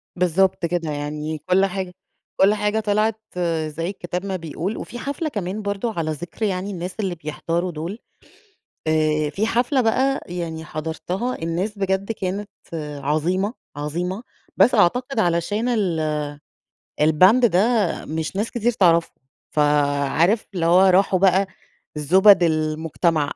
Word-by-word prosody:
بالضبط 180 +1 +2
كده 165 -2 -2
يعني 150 +1 -4
كل 185 +5 +2
حاجة 190 -1 -4 0.5
كل 195 +2 +6
حاجة 210 +1 0
طِلعت 215 +1 +1 0.5
زي 165 +3 -4
الكتاب 180 -1 -5
ما 195 -1 -2
بيقول، 170 +4 -4
وفي 240 - -7
حفلة 285 +3 -3
كمان 205 -3 -4
برضه 205 +3 -2
على 160 -3 -2
ذِكر 175 +8 -4
يعني 190 0 -2
الناس 180 0 -5
اللي 190 -4 -1
بيحضروا 165 +3 -3
دول، 170 +8 -5 0.9
آآ 155 -1 +1
في 205 +9 -1
حفلة 245 +4 +1
بقى 260 +4 +2
يعني 170 -2 -5
حضرتها 165 +10 -3
الناس 185 +6 -2
بجد 195 +2 0
كانت 200 +1 -4 0.3
عظيمة، 155 - -1 0.2
عظيمة، 175 +9 -3 0.3
بس 250 - +5
أعتقد 245 +6 +2
علشان 205 +5 +1
ال 165 -9 0 0.8
الband 185 +11 +5
ده 180 -5 +2 0.5
مش 160 +4 -4
ناس 210 +3 -1
كتير 240 0 0
تعرفه، 170 -6 +3 0.4
فعارف؟ 150 +6 +2
اللي 170 -3 0
هو 175 +2 +6
راحوا 190 0 +4
بقى 195 +1 +4 0.5
زُبَد 185 +6 +6
المجتمع. 155 -1 0
180 Hz, 130 wpm, -22 LUFS, 160-205 Hz, 0.9 s, كل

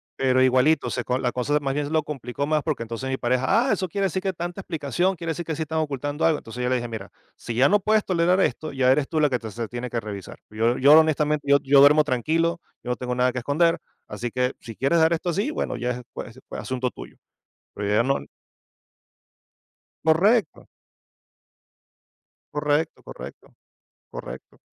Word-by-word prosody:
pero 130 -1 +2
igualito, 130 +4 +3
se 125 - -2
co 125 +1 -1
la 125 -2 -1
cosa 145 +4 0
más 135 -2 -2
bien 145 +1 -1
se - - -7
lo 160 -1 +2
complicó 140 -2 -4
más 155 0 +1
porque 150 -7 -2
entonces 115 +3 -5
mi 130 - -1
pareja: 130 - +2
"Ah, - - +4
eso 185 - -1
quiere 200 +4 -1
decir 190 0 -1
que 190 0 -1
tanta 175 +2 -5
explicación, 175 +3 -1
quiere 165 -1 -4
decir 170 +2 -4
que 160 - -3
sí 160 - -2
están 160 +1 -2
ocultando 145 0 -3
algo". 160 -2 +3
Entonces 120 +2 -7
yo 125 - 0
le 130 - +2
dije: 120 -1 -2
"Mira, 110 -4 -7 0.2
si 115 - -6
ya 130 +4 +5
no 205 - +4
puedes 215 +1 +2
tolerar 180 0 +2
esto, 155 -4 0
ya 130 -2 +3
eres 140 +1 +2
tú 160 - 0
la 150 -1 +4
que 125 -2 0
te 110 -1 -7
se 115 +1 -4
tiene 120 +2 -5
que 115 - -2
revisar. 100 -3 -8
Yo 115 +3 +1
yo 145 +4 +7
honestamente, 150 -1 +1
yo 140 - +7
yo 140 +1 +5
duermo 145 +2 +7
tranquilo, 165 +6 0 0.2
yo 125 - -3
no - - 0
tengo 125 0 -4
nada 125 +1 +2
que 125 - -3
esconder, 155 +7 +2 0.3
así 115 +3 -4
que 125 +1 0
si 115 -2 -9
quieres 140 +8 +2
dar 160 +1 +4
esto 170 +2 -2
así, 200 - 0
bueno, - - -3
ya 125 +1 -2
ej 125 0 -5
pues 120 +2 -8
pues - - -6
asunto 130 -1 -2
tuyo", - - -12 0.6
pero 105 - -4
yo 105 - +1
ya 110 - +4
no 135 +3 +1 1.9
Correcto. 180 +4 +2 1.8
Correcto, 150 +1 -1
correcto. - - -11 0.6
Correcto. - - -9
140 Hz, 210 wpm, -24 LUFS, 125-160 Hz, 1.9 s, yo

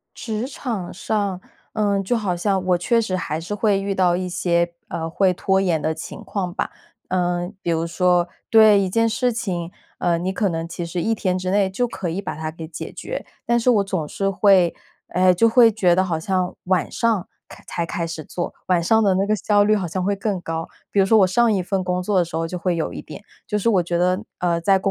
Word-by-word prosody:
职 220 +1 -3
场 230 -9 -5
上， 200 -2 -2 0.3
嗯， 205 -2 +1
就 240 +6 +1
好 200 -6 -1
像 190 +1 0
我 180 -1 +3
确 230 +6 +2
实 195 -5 -1
还 160 -3 -3
是 180 +5 -5
会 205 -1 +2
遇 195 0 -2
到 180 -2 +3
一 185 0 -3
些， 170 -1 0
呃， 165 0 -3
会 185 +3 +2
拖 190 +2 +1
延 175 -5 +1
的 160 +2 -1
情 160 - -8
况 185 -4 -3
吧。 - - -3 0.4
嗯， 175 +1 -1
比 170 - -1
如 165 0 0
说 175 0 +2 0.2
对 220 -2 +7
一 195 - 0
件 230 +4 +2
事 245 +2 0
情， 180 -7 -3 0.3
呃， 170 -1 +1
你 185 +3 -2
可 205 +1 0
能 165 -1 -3
其 170 0 -5
实 170 +1 -3
一 225 - +1
天 185 -4 -1
之 185 0 -3
内 200 0 +3
就 245 +6 0
可 195 -6 -5
以 175 +4 -2
把 195 - -5
它 155 0 -4
给 160 0 -8
解 160 - -7
决， - - -6 0.2
但 235 0 +3
是 235 - 0
我 210 -4 +3
总 185 -6 -3
是 195 +5 -1
会， 190 -3 +4 0.3
唉， 185 +1 +4
就 230 +6 +4
会 230 0 +6
觉 190 -5 +3
得 185 +1 +2
好 170 -4 -1
像 185 +2 -1
晚 185 -1 +1
上 225 -6 0 0.2
开 - - -13
才 170 - -2
开 170 0 -3
始 165 -2 -6
做， 175 +4 -4
晚 180 -2 +3
上 220 +6 +3
的 195 -3 +3
那 195 +2 +1
个 215 - +2
效 205 0 +3
率 215 +1 +3
好 190 -3 -2
像 185 +3 -3
会 200 +1 +1
更 200 -2 -2
高， 165 -1 -4 0.2
比 - - -1
如 - - +5
说 220 +2 +5
我 195 - +6
上 225 +5 +3
一 195 -3 +1
份 190 +1 -1
工 180 0 -1
作 195 +1 +1
的 180 - +3
时 165 - -12
候 165 0 -1
就 180 +2 -5
会 175 0 0
有 160 - -2
一 - - -5
点， - - -10 0.2
就 210 - -1
是 210 - 0
我 195 -6 +3
觉 175 0 -2
得， 180 +4 +1
呃， 175 -1 +1
在 195 +3 +3
工 195 +1 0
185 Hz, 265 characters per minute, -22 LUFS, 175-205 Hz, 0.4 s, 对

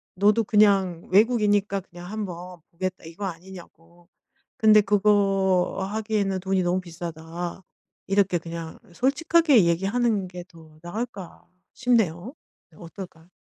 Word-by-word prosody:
너도 210 +4 +3
'그냥 195 -5 +2
외국이니까 205 -1 +3
그냥 175 0 -11
한번 180 -4 -6
보겠다.' 185 0 -5
이거 170 +5 -9
아니냐고. 175 -1 -12 0.5
근데 215 -1 +6
그거 195 -2 +2
하기에는 210 -3 -1
돈이 190 0 0
너무 180 +1 0
비싸다." 170 +1 -7 0.4
이렇게 195 -2 +2
그냥 165 -1 -8
솔직하게 280 - +3
얘기하는 195 +4 0
게 180 -1 -9
더 160 -3 -18
나을까 200 0 -7 0.3
싶네요. 230 - 0 0.4
어떨까 170 -1 -11
190 Hz, 275 characters per minute, -24 LUFS, 175-210 Hz, 0.5 s, 근데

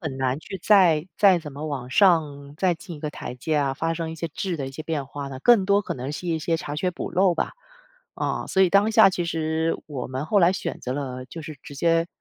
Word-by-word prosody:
很 145 -6 -5
难 130 +1 0
去 195 +4 -8
再 180 -6 +5
再 195 -4 +5
怎 150 -4 -9
么 150 +3 -6
往 130 -4 -5
上 145 -4 +2
再 180 -1 +2
进 170 0 -10
一 - - -13
个 150 0 -3
台 125 - -7
阶 150 +5 -2
啊， 140 -2 +1
发 165 +3 -1
生 165 -1 -4
一 - - -6
些 165 +1 -4
质 180 +2 -3
的 135 -3 -4
一 - - -8
些 145 +4 -7
变 155 -3 -3
化 140 0 -6
呢， 130 -1 -7
更 235 -6 +5
多 200 +1 +3
可 - - -4
能 130 +2 -5
是 180 - -6
一 165 -1 0
些 165 +1 0
查 150 -3 -5
缺 180 +4 0
补 - - -5
漏 185 -1 +3
吧， - - -2 0.6
啊。 - - -2
所 190 - +2
以 180 - +4
当 200 +2 +4
下 220 -3 +7
其 175 -2 -2
实 160 0 -1
我 140 -5 -5
们 130 +3 -4
后 200 +6 +2
来 175 0 +5
选 - - -4
择 125 - -3
了 130 -2 -4
就 165 +4 -9
是 150 -1 -8
直 145 - -10
接 165 +3 +2
160 Hz, 280 characters per minute, -24 LUFS, 145-180 Hz, 0.6 s, 下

